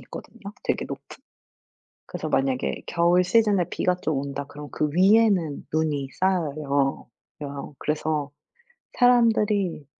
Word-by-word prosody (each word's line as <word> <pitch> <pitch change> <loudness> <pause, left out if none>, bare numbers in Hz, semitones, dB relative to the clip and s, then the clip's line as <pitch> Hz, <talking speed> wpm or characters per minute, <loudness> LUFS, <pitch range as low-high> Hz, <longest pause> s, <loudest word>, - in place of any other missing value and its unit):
있거든요 - - -11 0.3
되게 - - 0
높은. - - -7 1.0
그래서 - - -5
만약에 135 -1 0
겨울 175 +2 +3
시즌에 200 -1 +3
비가 180 - 0
좀 160 -5 -2
온다 140 0 -5
그러면 145 0 -10
그 150 - -1
위에는 190 -5 +3
눈이 150 -4 0
쌓여요. 150 -7 0 0.3
여 140 0 -6
그래서 150 -1 -2 0.7
사람들이 215 - +3
160 Hz, 265 characters per minute, -24 LUFS, 145-190 Hz, 1.0 s, 겨울